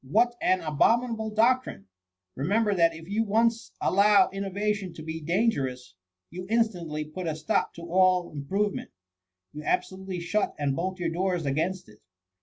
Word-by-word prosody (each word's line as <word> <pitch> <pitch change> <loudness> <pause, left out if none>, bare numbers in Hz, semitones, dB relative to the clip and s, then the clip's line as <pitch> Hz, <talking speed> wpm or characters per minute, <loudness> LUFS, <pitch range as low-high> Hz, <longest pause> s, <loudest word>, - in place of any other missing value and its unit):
What 230 - +2
an 185 0 +2
abominable 220 - +1
doctrine! 225 - +1 0.5
Remember, 205 - +1
that 165 -3 +3
if 160 0 -11
you 210 +3 0
once 230 +2 +1
allow 200 0 +4
innovation 200 -1 -2
to 155 - -9
be 160 +1 -5
dan 190 +9 +2
gerous, 125 - -5 0.4
you 180 +1 -7
instantly 175 -10 0
put 170 +4 -6
a 155 - -1
stop 155 0 -1
to 170 - -9
all 180 0 +2
improve 190 +8 -1
ment - - -6 0.4
— 90 +1 -35
^you 150 - -6
absolutely 190 +2 -2
shut 185 +5 -1
and 140 -2 0
bolt 185 +3 -2
your 175 -2 -1
doors 180 -1 -1
against 165 +7 -1
it. 105 0 -18
185 Hz, 165 wpm, -27 LUFS, 155-210 Hz, 0.5 s, allow